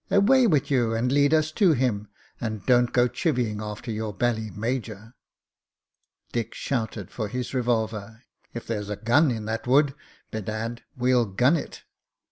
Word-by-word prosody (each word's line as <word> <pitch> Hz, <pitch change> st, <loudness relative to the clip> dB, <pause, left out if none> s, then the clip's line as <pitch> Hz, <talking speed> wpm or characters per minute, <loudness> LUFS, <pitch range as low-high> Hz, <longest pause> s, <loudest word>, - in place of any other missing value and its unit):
Away 240 Hz, +6 st, +5 dB
with 150 Hz, -7 st, +1 dB
you, 120 Hz, -4 st, +2 dB
and 120 Hz, +3 st, 0 dB
lead 145 Hz, +1 st, +4 dB
us 155 Hz, -1 st, +2 dB
to 185 Hz, -1 st, +4 dB
him, 120 Hz, -6 st, 0 dB, 0.3 s
and 110 Hz, -4 st, -4 dB
don't 125 Hz, -1 st, +4 dB
go 125 Hz, 0 st, +4 dB
chivying 120 Hz, -, -1 dB
after 105 Hz, +3 st, -6 dB
your 110 Hz, 0 st, -3 dB
bally 110 Hz, +1 st, -1 dB
major." 115 Hz, 0 st, -4 dB, 1.2 s
Dick 115 Hz, -1 st, -3 dB
shouted 110 Hz, -7 st, -3 dB
for 110 Hz, -3 st, -3 dB
his 125 Hz, +5 st, -4 dB
revolver. 110 Hz, -2 st, -1 dB, 0.3 s
"If 120 Hz, -, -7 dB
there's 105 Hz, -3 st, -3 dB
a 105 Hz, -, -2 dB
gun 135 Hz, +9 st, +3 dB
in 110 Hz, -3 st, -3 dB
that 110 Hz, +2 st, -3 dB
wood, 140 Hz, +2 st, +4 dB, 0.4 s
bedad! 110 Hz, +2 st, -4 dB, 0.2 s
we'll 125 Hz, -2 st, +3 dB
gun 125 Hz, -, +3 dB
it." 155 Hz, -, -6 dB
120 Hz, 155 wpm, -25 LUFS, 110-130 Hz, 1.2 s, Away